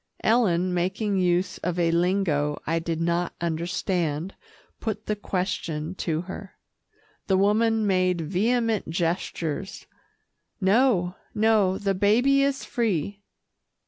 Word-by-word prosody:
Ellen, 185 -6 +2
making 195 +3 0
use 180 +1 +1
of 180 0 -2
a 170 -1 +2
lingo 170 -4 +1
I 165 +1 0
did 165 -1 -3
not 170 +1 0
understand, 170 0 -2 0.5
put 215 -2 -4
the 210 - -1
question 180 -5 -3
to 165 -4 -2
her. 190 +1 -9 0.7
The 190 - +3
woman 220 +3 +2
made 185 -3 +2
vehement 220 +6 0
gestures, 170 +1 -3 0.7
"No, 195 -3 +2 0.2
no, 210 -3 +3
the 200 -1 0
baby 235 +8 +3
is 275 0 0
free." 205 - -1
185 Hz, 110 wpm, -25 LUFS, 170-210 Hz, 0.7 s, The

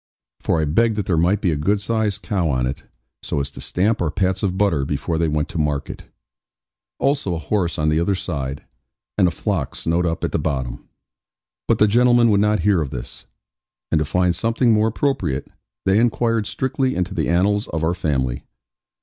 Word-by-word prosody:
For 80 - 0
I 80 - +1
begged 110 +9 +2
that 105 -3 -2
there 90 - +1
might 90 +6 +2
be 90 - +1
a - - 0
good 95 +8 +1
sized 110 -1 -1
cow 90 -6 0
on 65 -3 +1
it, 65 +2 -5 0.4
so - - -2
as 70 0 -3
to - - -10
stamp 105 +5 0
our 85 - +1
pats 95 +2 0
of 95 -2 -1
butter 95 -8 +2
before 75 +3 -2
they 85 - +2
went 75 -1 0
to - - -4
market: 75 -2 -2 0.9
also 135 -9 0
a - - -2
horse 85 +1 -1
on 75 0 +1
the 75 +1 +2
other 95 +4 +1
side, 70 -6 -4 0.5
and 90 - +5
a - - +3
flock 85 - -2
snowed 85 +2 0
up 80 - -3
at - - -1
the - - 0
bottom. 65 -5 -3 0.8
But - - +3
the 105 - +5
gentlemen 120 +1 +4
would 100 -1 +3
not 105 -2 +2
hear 95 -2 +3
of 75 - -3
this; 60 -2 -8 0.6
and 80 - +3
to 75 - 0
find 90 +3 +1
something 115 +5 +2
more 110 0 +3
appropriate, 110 - -1 0.4
they 95 +2 +4
inquired 115 -2 +1
strictly 130 0 -1
into 90 -1 -2
the - - -1
annals 100 +5 +2
of 80 -1 -3
our 80 +2 +2
family. 65 -8 -1
90 Hz, 200 wpm, -21 LUFS, 75-105 Hz, 0.9 s, and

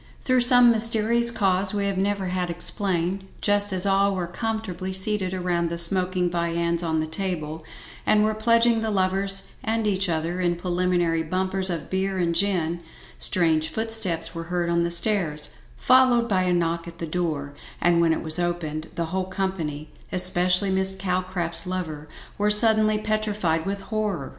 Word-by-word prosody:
Through 255 -1 +2
some 245 -1 +7
mysterous 230 +1 +3
cause 195 -3 0
we 200 -1 -1
have 200 -1 -1
never 195 0 -1
had 180 -1 -2
explained, 180 +1 -1 0.2
just 205 0 +1
as 185 0 +1
all 195 0 +2
were 180 -2 -2
comfortably 190 -1 -4
seated 190 0 0
around 175 -2 -1
the 170 - -4
smoking 180 +1 +2
viands 170 0 -1
on 160 -2 -1
the - - -2
table, 160 -2 -3 0.4
and 210 0 +3
were 215 0 +1
pledging 230 +1 +2
the 220 - -2
lovers 195 0 0
and 225 0 -1
each 195 -2 +1
other 165 +2 -2
in 175 -1 +1
preliminary 175 -1 0
bumpers 185 +3 -1
of 170 -3 -5
beer 190 0 -1
and 170 -2 0
gin, 170 -2 0 0.4
strange 160 -3 +2
footsteps 220 -5 -2
were 165 0 -6
heard 175 0 -2
on 170 0 +1
the 170 - 0
stairs, 170 -5 +3 0.3
followed 255 -2 +4
by 185 -4 +1
a 180 - +1
knock 170 0 -1
at 170 0 -10
the 170 - -5
door, 155 -4 -3 0.3
and 170 -1 +3
when 165 -1 +3
it 160 - -1
was 160 +2 0
opened, 165 -3 -3
the 170 - -2
whole 190 0 -1
company, 185 -6 -4 0.2
especially 180 +1 +2
Miss 190 0 +1
Calcraft's 185 -2 -2
lover, 160 -5 -5 0.3
were 210 +1 +2
suddenly 215 0 +3
petrified 210 -6 -1
with 200 0 -3
horror. 205 -10 -3
185 Hz, 165 wpm, -24 LUFS, 170-205 Hz, 0.4 s, some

